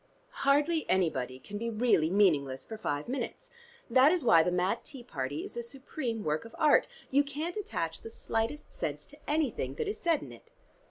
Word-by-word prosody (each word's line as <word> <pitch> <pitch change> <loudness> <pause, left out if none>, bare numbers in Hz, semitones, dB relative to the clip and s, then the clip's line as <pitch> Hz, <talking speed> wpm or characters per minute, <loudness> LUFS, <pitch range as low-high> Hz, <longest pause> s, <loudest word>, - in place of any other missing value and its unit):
Hardly 295 +3 +3
anybody 130 -9 +1
can 205 +10 -7
be 230 +1 -2
really 215 -8 +3
meaningless 150 -9 +2
for 220 - -7
five 145 -9 -3
minutes. 275 - -4 0.4
That 260 +5 +6
is 355 -4 +1
why 170 -9 +7
the 180 - +1
Mad 180 +5 0
Tea 270 -5 -9
Party 145 - -4
is - - -8
a 240 - -2
supreme 240 -2 -4
work 155 0 0
of 230 - -12
art: 300 -1 +5 0.2
you 280 +2 +5
can't 300 +5 -4
attach 165 - -3
the - - -8
slightest 225 +5 -3
sense - - -3
to - - -16
anything 275 - 0
that - - -2
is 415 - -2
said 335 -3 +1
in - - -9
it." - - -15
230 Hz, 195 wpm, -30 LUFS, -, 0.4 s, why